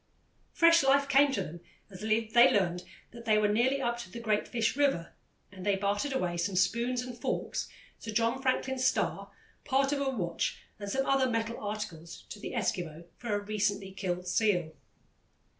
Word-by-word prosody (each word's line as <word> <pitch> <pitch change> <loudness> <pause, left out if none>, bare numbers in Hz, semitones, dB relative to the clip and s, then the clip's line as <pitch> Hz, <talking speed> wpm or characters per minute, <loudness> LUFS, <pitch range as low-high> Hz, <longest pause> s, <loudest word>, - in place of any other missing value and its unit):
Fresh 335 -1 +5
life 280 +1 +3
came 275 +1 +5
to 270 - -1
them 170 +3 -8 0.3
as 185 - -10
they 225 +2 +4
learned 180 -3 +1 0.3
that 235 0 -11
they 215 -1 +4
were 215 0 +3
nearly 240 +6 +2
up 240 -2 -1
to 235 - -8
the 235 - -8
Great 215 -2 0
Fish 230 -1 0
River, 275 -13 +1 0.4
and 190 -2 -10
they 200 0 +2
bartered 205 +8 -1
away 180 -10 -1
some 185 +3 -1
spoons 240 +6 +1
and 250 -1 -7
forks, - - -2 0.3
Sir - - -8
John 230 +4 +1
Franklin's 265 -1 0
star, 255 - 0 0.3
part 275 0 +2
of 285 -1 0
a 275 - +1
watch 175 -10 -2 0.2
and 205 -1 -5
some 270 +6 0
other 270 -1 +2
metal 230 0 -2
articles 180 -6 -6
to 210 - -8
the - - -6
Eskimo 170 -8 -2
for 235 -4 -2
a - - 0
recently 205 -1 -1
killed 180 -2 -3
seal. 180 -4 +1
220 Hz, 180 wpm, -30 LUFS, 195-255 Hz, 0.4 s, Fresh